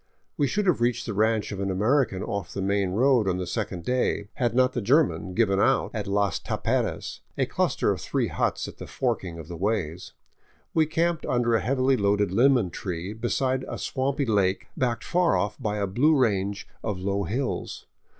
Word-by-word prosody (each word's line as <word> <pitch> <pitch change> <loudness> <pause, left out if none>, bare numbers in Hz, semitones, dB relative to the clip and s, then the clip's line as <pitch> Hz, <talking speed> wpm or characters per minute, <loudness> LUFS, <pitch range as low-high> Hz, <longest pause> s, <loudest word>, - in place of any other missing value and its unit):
We 145 - +1
should 210 +8 0
have 175 -10 +2
reached 120 0 +1
the 115 - -3
ranch 110 0 +1
of 100 - -5
an 100 0 -1
Amer 110 +10 +3
ican 95 0 -6
off 100 -4 -4
the 100 - -2
main 100 -1 0
trail 130 0 +4
on 90 -1 +1
the 90 - -3
second 95 -5 -4
day, 125 -5 0
had 120 -3 -1
not 130 0 +3
the 120 - -1
German 120 - +2
given 100 -4 +2
out 135 +6 +2
at 105 -3 -3
Las 100 -3 +1
Taperas, - - -2 0.2
a - - +2
cluster - - 0
of - - -3
three - - 0
huts - - -1
at - - -10
the - - -7
forking 85 -3 -2
of 80 -2 -9
the 85 - -7
ways. 90 -3 -2 0.6
We 160 -1 +3
camped 165 +1 0
under 120 -1 +1
a 115 - +3
heavily 130 +1 +2
loaded 100 -1 +2
lemon 120 -3 +3
tree, 90 +2 -4
beside 130 +3 -1
a - - -5
swampy 135 +1 -1
lake 100 -4 +1
backed 120 -2 -1
far 175 -1 +2
off 100 +5 -2
by 105 -3 -1
a 100 - 0
blue 140 +11 +3
range 100 -5 0 0.2
of 105 -4 -2
low 100 +2 -1
hills. 125 +9 -3
110 Hz, 200 wpm, -26 LUFS, 100-130 Hz, 0.6 s, trail